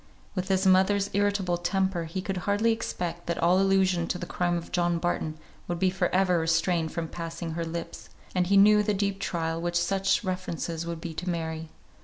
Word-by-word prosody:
With 185 -1 -3
his 190 0 +1
mother's 190 +2 +4
irritable 200 -3 +1
temper 180 -1 0
he 185 +3 -4
could 195 -1 -3
hardly 215 +3 +3
expect 175 -6 -3
that 170 - -1
all 175 +2 +3
allusion 190 -3 +2
to - - -2
the 175 - -5
crime 175 0 0
of 170 - -7
John 175 -1 +1
Barton 165 -2 -2 0.3
would 175 - -2
be 185 +1 +2
for 185 -1 0
ever 180 -2 +2
restrained 165 0 +1
from 165 -1 -3
passing 165 0 -5
her 165 +1 -3
lips, 165 +1 -6 0.2
and 180 -1 +1
he 200 +1 +4
knew 210 +1 +7
the 210 0 0
deep 200 0 -1
trial 165 -3 -2
such 195 +4 +1
references 170 -3 -3
would 170 -1 -5
be 165 -1 -5
to 180 +3 -4
Mary. 160 -2 -3
180 Hz, 195 wpm, -27 LUFS, 170-195 Hz, 0.3 s, knew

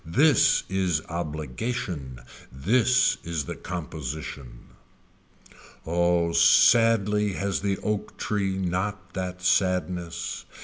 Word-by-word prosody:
This 130 - +3
is 90 -4 0
obligation. 80 - -4 0.3
This 115 - +2
is 80 -4 -3
the - - -5
composition. 75 -7 -7 1.2
Oh 85 0 +1
sadly 105 +3 +4
has 100 0 -2
the 100 -1 -1
oak 105 0 -3
tree 100 -2 -1
not 95 0 -3
that 90 -1 -5
sadness. 90 -2 -1
90 Hz, 90 wpm, -25 LUFS, 85-100 Hz, 1.2 s, sadly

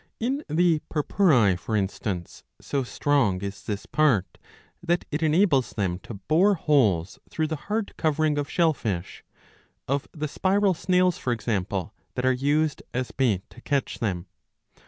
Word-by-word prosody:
In 270 +6 -1
the 165 0 +3
Purpurae,^^ 140 - +3
for 110 +4 -3
instance, 95 -3 -3 0.2
so 140 - -2
strong 125 -6 +1
is 100 0 -5
this 105 -1 -4
part 130 -12 +1 0.4
that 175 0 0
it 150 +2 -2
enables 155 -4 +3
them 90 -4 -1
to 110 - -9
bore 165 - +3
holes 110 - +2
through 160 - -1
the 155 +1 -2
hard 215 0 -1
covering 155 -1 +1
of 145 - -3
shell 165 -2 +3
fish, 95 -9 -4 0.6
of 140 +1 -1
the 155 -1 -4
spiral 195 +5 +2
snails, 180 0 +2
for 125 - -1
example, 105 -4 -2 0.2
that 125 - -1
are 130 - +5
used 145 +3 +1
as 125 0 -2
bait 110 -8 0
to 120 - -14
catch 140 -1 -1
them. 90 -6 -2
140 Hz, 155 wpm, -25 LUFS, 105-160 Hz, 0.6 s, are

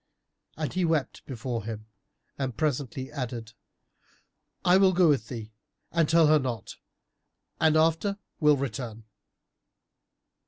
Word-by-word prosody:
And 155 -2 -3
he 185 - 0
wept 160 -4 0
before 120 -3 -4
him 110 0 -6 0.5
and 130 -4 -3
presently 135 -3 -2
added, 120 -5 -5 1.1
"I 180 +1 +6
will 190 -1 +5
go 180 -1 +5
with 130 -7 +2
thee 110 -3 -7 0.4
and 165 -3 +2
tell 165 -1 +6
her 155 0 +5
not 125 -6 -4 0.8
and 155 -1 +4
after 165 +5 +2 0.2
will 150 -2 +5
return." 115 -4 -4
140 Hz, 120 wpm, -28 LUFS, 115-160 Hz, 1.1 s, I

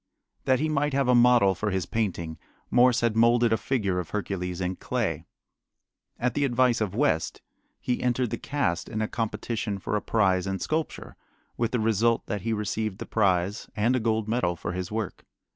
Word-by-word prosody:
That 130 -1 +3
he 155 - +1
might 150 -2 0
have 135 -2 +2
a 125 - +5
model 120 -5 +5
for 105 +4 -2
his 95 -3 -1
painting 90 -7 -3 0.3
Morse 125 0 +5
had 115 -2 +1
molded 115 0 +4
a - - +5
figure 100 -10 -1
of 85 -3 -5
Hercules 90 -2 -3
in 90 0 -2
clay. - - -2 0.9
At 125 0 0
the 145 - 0
advice 125 -3 +2
of 100 -2 -1
West 120 - 0 0.4
he 125 - -2
entered 125 -1 0
the - - -3
cast 140 -13 -1
in 110 - -3
a - - -1
competition 110 -1 -3
for 100 - -3
a 105 - 0
prize 95 -4 +1
in 95 0 -1
sculpture, 155 - -3 0.4
with 115 -1 0
the 125 - -1
result 115 +1 +2
that 105 -2 -3
he 115 - -2
received 105 -1 -2
the - - -6
prize 100 -1 0
and 115 +4 +2
a - - +2
gold 110 -1 0
medal 110 -6 0
for 85 - -5
his 90 +1 -4
work. 110 -4 -4
110 Hz, 195 wpm, -26 LUFS, 95-120 Hz, 0.9 s, a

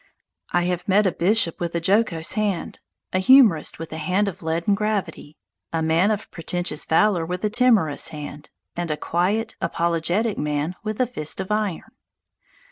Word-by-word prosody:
I 175 - +2
have 180 +2 -2
met 205 +2 +4
a 190 - +3
bishop 180 0 +1
with 170 -1 -3
a - - +2
jocose 185 -2 +1
hand, 205 -5 -2 0.3
a 185 - +2
humourist 215 - +5
with 165 -1 -7
a 160 - -5
hand 185 +6 +1
of 195 - -5
leaden 165 +4 0
gravity, 200 -7 -3 0.3
a 165 -1 -1
man 165 +5 +3
of 215 -1 -3
pretentious 175 -2 -3
valour 175 +1 +3
with 180 +4 -3
a 210 - 0
timorous 220 - +2
hand, 150 -1 -8 0.3
and 175 -1 -3
a 150 - -1
quiet, 185 +8 -1
apologetic 170 +6 0
man 150 +3 -1
with 215 -1 -4
a 255 - +3
fist 155 -11 -4
of 190 +1 -4
iron. 210 -5 -2
180 Hz, 170 wpm, -23 LUFS, 160-210 Hz, 0.3 s, humourist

